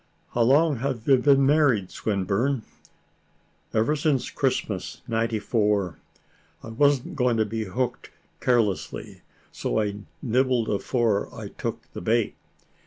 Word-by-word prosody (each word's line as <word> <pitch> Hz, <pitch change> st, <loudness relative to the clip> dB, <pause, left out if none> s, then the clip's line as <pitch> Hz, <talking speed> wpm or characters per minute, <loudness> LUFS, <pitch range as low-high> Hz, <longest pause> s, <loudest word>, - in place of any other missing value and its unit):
"How 120 Hz, -, +1 dB
long 145 Hz, +5 st, +4 dB
have 125 Hz, -2 st, -3 dB
you 135 Hz, -2 st, +6 dB
been 135 Hz, +1 st, +4 dB
married, 135 Hz, -, +3 dB
Swinburne?" 110 Hz, +5 st, -1 dB, 1.1 s
"Ever 115 Hz, +7 st, +2 dB
since 145 Hz, -4 st, 0 dB
Christmas -, -, -2 dB
'94. 105 Hz, -4 st, 0 dB, 0.6 s
I -, -, -8 dB
wasn't 140 Hz, +4 st, +2 dB
going 125 Hz, -4 st, +2 dB
to 110 Hz, -, +2 dB
be 110 Hz, +1 st, -3 dB
hook'd 120 Hz, +6 st, -3 dB, 0.3 s
carelessly, 115 Hz, -6 st, 0 dB, 0.3 s
so -, -, -1 dB
I 105 Hz, -1 st, -1 dB, 0.3 s
nibbled 125 Hz, -1 st, +1 dB
afore 110 Hz, 0 st, 0 dB
I -, -, -6 dB
took -, -, -5 dB
the -, -, -6 dB
bait. 110 Hz, +4 st, +1 dB
115 Hz, 120 wpm, -25 LUFS, 110-135 Hz, 1.1 s, you